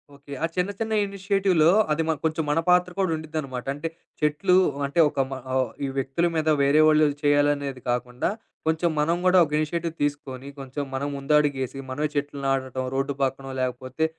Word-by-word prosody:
Okay. 140 Hz, 0 st, -11 dB
ఆ -, -, +5 dB
చిన్న, 180 Hz, +1 st, 0 dB
చిన్న 225 Hz, -1 st, -2 dB
ఇనిషియేటివ్‌లో 195 Hz, -4 st, +2 dB, 0.2 s
అది 150 Hz, +2 st, +1 dB
మ -, -, +3 dB
కొంచెం 160 Hz, 0 st, 0 dB
మన 155 Hz, -, +2 dB
పాత్ర 180 Hz, 0 st, +4 dB
కూడా 190 Hz, -3 st, +1 dB
ఉడిద్దనమాట. 155 Hz, -5 st, -5 dB
అంటే 145 Hz, +3 st, -4 dB, 0.3 s
చెట్లు 150 Hz, +5 st, +2 dB, 0.3 s
అంటే, 140 Hz, +5 st, -2 dB
ఒక 140 Hz, -, -6 dB
మ -, -, -5 dB, 0.2 s
ఆహ్, 130 Hz, -2 st, +1 dB, 0.2 s
ఈ -, -, -1 dB
వ్యక్తుల 135 Hz, +6 st, 0 dB
మీద, 160 Hz, -1 st, 0 dB
వేరే 140 Hz, +2 st, +4 dB
వాళ్ళు 155 Hz, 0 st, +5 dB, 0.2 s
చేయాలనేది 145 Hz, -2 st, +2 dB
కాకుండా, 125 Hz, +1 st, -1 dB, 0.4 s
కొంచెం 160 Hz, +2 st, +2 dB
మనం 160 Hz, +3 st, +2 dB
గూడా 185 Hz, 0 st, +5 dB
ఒక 150 Hz, -, -11 dB
ఇనిషియేటివ్ 165 Hz, +2 st, -2 dB
తీసుకొని 140 Hz, -2 st, -3 dB
కొంచెం 135 Hz, +2 st, -5 dB
మనం 140 Hz, +2 st, -2 dB
ముందడిగేసి, 140 Hz, -2 st, +1 dB
మనమే 150 Hz, +3 st, -1 dB
చెట్లు 145 Hz, 0 st, -2 dB
నాటటం, 130 Hz, -1 st, -1 dB
రోడ్డు 135 Hz, +1 st, 0 dB
పక్కనో, 135 Hz, 0 st, -2 dB
లేకపోతే 130 Hz, +3 st, -3 dB
145 Hz, 170 wpm, -25 LUFS, 135-160 Hz, 0.4 s, ఆ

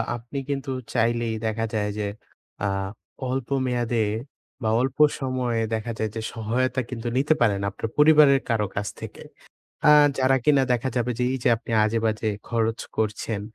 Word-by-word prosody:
আপনি 120 Hz, +4 st, -8 dB
কিন্তু 135 Hz, -1 st, -2 dB, 0.2 s
চাইলেই 115 Hz, -1 st, +1 dB
দেখা 110 Hz, +1 st, -1 dB
যায় 105 Hz, -1 st, 0 dB
যে, 105 Hz, -, -1 dB, 0.5 s
অ্যাঁ 95 Hz, -1 st, -1 dB, 0.4 s
অল্প 130 Hz, -1 st, -2 dB, 0.2 s
মেয়াদে 120 Hz, -3 st, 0 dB, 0.6 s
বা, 110 Hz, -, 0 dB
অল্প 135 Hz, +1 st, -2 dB, 0.2 s
সময়ে 125 Hz, -3 st, -1 dB
দেখা 110 Hz, +1 st, -2 dB
যায় 110 Hz, -, 0 dB
যে, 110 Hz, -, -3 dB
সহায়তা 125 Hz, +3 st, 0 dB
কিন্তু 120 Hz, -2 st, -5 dB
নিতে 145 Hz, +4 st, +3 dB
পারেন 105 Hz, -4 st, +3 dB
আপনার 115 Hz, -, -5 dB
পরিবারের 150 Hz, -2 st, +6 dB
কারো 110 Hz, -2 st, +1 dB
কাছ 100 Hz, +1 st, -2 dB
থেকে। -, -, -8 dB, 0.6 s
অ্যাঁ 150 Hz, -1 st, +7 dB
যারা 130 Hz, 0 st, +4 dB
কিনা 145 Hz, -3 st, +4 dB
দেখা 125 Hz, +2 st, 0 dB
যাবে 120 Hz, 0 st, +1 dB
যে, 125 Hz, -, +1 dB
এইযে 130 Hz, -2 st, 0 dB
আপনি 115 Hz, -, -11 dB
আজেবাজে 110 Hz, 0 st, 0 dB, 0.2 s
খরচ 115 Hz, -1 st, 0 dB, 0.2 s
করছেন, 110 Hz, 0 st, -1 dB
120 Hz, 155 wpm, -24 LUFS, 110-130 Hz, 0.6 s, অ্যাঁ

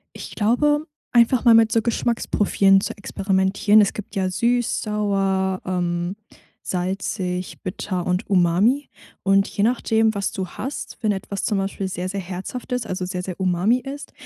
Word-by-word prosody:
Ich -, -, -8 dB
glaube, 295 Hz, +8 st, +2 dB, 0.3 s
einfach 240 Hz, +1 st, +4 dB
mal 235 Hz, -2 st, +7 dB
mit 225 Hz, -1 st, +5 dB
so 225 Hz, -, +3 dB
Geschmacksprofilen 205 Hz, -4 st, +2 dB
zu -, -, -4 dB
experimentieren. 195 Hz, +1 st, +2 dB
Es 205 Hz, -, +3 dB
gibt 210 Hz, 0 st, -8 dB
ja 190 Hz, -1 st, +1 dB
süß, 235 Hz, +6 st, 0 dB
sauer, 195 Hz, -3 st, 0 dB
ähm, 175 Hz, 0 st, -2 dB, 0.5 s
salzig, 185 Hz, 0 st, -3 dB
bitter 185 Hz, -1 st, -4 dB
und 180 Hz, +1 st, -1 dB
umami, 200 Hz, +9 st, +2 dB, 0.3 s
und 195 Hz, +1 st, +3 dB
je 200 Hz, -, -1 dB
nachdem, 225 Hz, -2 st, +2 dB
was 200 Hz, -1 st, -1 dB
du 190 Hz, -2 st, -3 dB
hast, 265 Hz, +4 st, -6 dB
wenn 220 Hz, -4 st, +1 dB
etwas 195 Hz, 0 st, -5 dB
zum 210 Hz, -4 st, +1 dB
Beispiel 195 Hz, 0 st, -2 dB
sehr, 180 Hz, 0 st, -4 dB
sehr 200 Hz, +1 st, -3 dB
herzhaft 190 Hz, +8 st, -7 dB
ist, 250 Hz, -2 st, -1 dB
also 185 Hz, 0 st, -3 dB
sehr, 180 Hz, -1 st, -4 dB
sehr 185 Hz, 0 st, -7 dB
umami 190 Hz, +7 st, +2 dB
ist, 275 Hz, +3 st, -8 dB
195 Hz, 160 wpm, -22 LUFS, 185-225 Hz, 0.5 s, mal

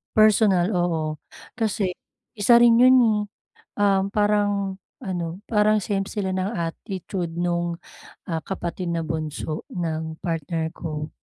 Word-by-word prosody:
Personal, 210 Hz, -3 st, +4 dB
oo. 160 Hz, -3 st, 0 dB, 0.4 s
Kasi 215 Hz, -4 st, 0 dB, 0.5 s
isa 235 Hz, +4 st, +5 dB
rin 235 Hz, -1 st, +6 dB
yun 255 Hz, +1 st, +7 dB
eh, 220 Hz, -3 st, +3 dB, 0.6 s
um, 195 Hz, -1 st, +3 dB
parang 205 Hz, -2 st, +1 dB, 0.2 s
ano, 175 Hz, -6 st, -4 dB
parang 215 Hz, -1 st, +3 dB
same 200 Hz, -1 st, -1 dB
sila 190 Hz, -3 st, -2 dB
ng 185 Hz, +1 st, -1 dB
attitude 175 Hz, +1 st, -4 dB
nung, 175 Hz, -1 st, -1 dB, 0.5 s
ah, 165 Hz, -, 0 dB
kapatid 175 Hz, -2 st, -3 dB
na 165 Hz, -, -1 dB
bunso 155 Hz, -1 st, -4 dB
ng 160 Hz, -2 st, -3 dB
partner 165 Hz, -1 st, -2 dB
ko. 150 Hz, -2 st, -5 dB
185 Hz, 125 wpm, -24 LUFS, 165-205 Hz, 0.6 s, yun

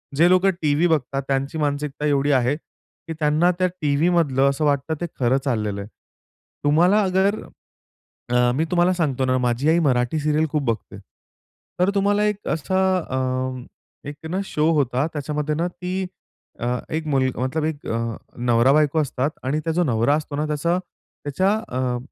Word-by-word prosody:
जे 170 Hz, +5 st, +5 dB
लोकं 185 Hz, +1 st, +4 dB
टीव्ही 155 Hz, +3 st, +2 dB
बघतात 135 Hz, -4 st, 0 dB
त्यांची 135 Hz, +3 st, -1 dB
मानसिकता 145 Hz, -1 st, -2 dB
एवढी 145 Hz, 0 st, +2 dB
आहे, 130 Hz, +1 st, +2 dB
की 165 Hz, +1 st, -13 dB
त्यांना 155 Hz, +3 st, +3 dB
त्या 185 Hz, -, +3 dB
टीव्हीमधलं 145 Hz, -2 st, +2 dB
असं 140 Hz, +2 st, -1 dB
वाटतं 145 Hz, +2 st, +1 dB
ते 175 Hz, -, 0 dB
खरं 130 Hz, +1 st, +3 dB
चाललेलं 105 Hz, -6 st, -1 dB
आहे. 100 Hz, -, -9 dB, 0.7 s
तुम्हाला 175 Hz, +8 st, +4 dB
अगर 195 Hz, +2 st, +1 dB, 0.9 s
अ, 125 Hz, 0 st, +3 dB
मी 160 Hz, -, +1 dB
तुम्हाला 175 Hz, 0 st, +3 dB
सांगतो 140 Hz, -7 st, 0 dB
ना 130 Hz, 0 st, +2 dB
माझी 125 Hz, +3 st, 0 dB
आई 165 Hz, +2 st, +4 dB
मराठी 130 Hz, -1 st, +1 dB
सीरियल 150 Hz, +1 st, +1 dB
खूप 150 Hz, -, 0 dB
बघते. 115 Hz, -3 st, -3 dB, 0.8 s
तर 180 Hz, +2 st, +3 dB
तुम्हाला 205 Hz, +1 st, +2 dB
एक 210 Hz, -1 st, -2 dB
असा 165 Hz, +4 st, -2 dB, 0.2 s
अ, 130 Hz, -2 st, -5 dB
एक 145 Hz, -, -8 dB
ना 185 Hz, -, -2 dB
शो 155 Hz, -3 st, +1 dB
होता, 135 Hz, -2 st, +1 dB
त्याच्यामध्ये 150 Hz, +1 st, -2 dB
ना 170 Hz, +3 st, 0 dB
ती 185 Hz, +1 st, -4 dB, 0.5 s
अ, -, -, -3 dB, 0.3 s
एक 160 Hz, 0 st, -2 dB
मुलगा 130 Hz, -3 st, 0 dB
मतलब 150 Hz, +4 st, -1 dB
एक 155 Hz, -2 st, -4 dB
अ, 115 Hz, 0 st, -2 dB, 0.2 s
नवरा-बायको 135 Hz, +6 st, +3 dB
असतात 140 Hz, -1 st, -1 dB
आणि 140 Hz, +4 st, 0 dB
त्या 165 Hz, -, 0 dB
जो 175 Hz, +2 st, +2 dB
नवरा 120 Hz, 0 st, +2 dB
असतो 150 Hz, -1 st, -4 dB
ना 150 Hz, +1 st, -1 dB
त्याचा 155 Hz, +4 st, 0 dB
त्याच्या 180 Hz, 0 st, -3 dB, 0.2 s
अ, 125 Hz, -1 st, -1 dB
145 Hz, 165 wpm, -22 LUFS, 130-165 Hz, 0.9 s, जे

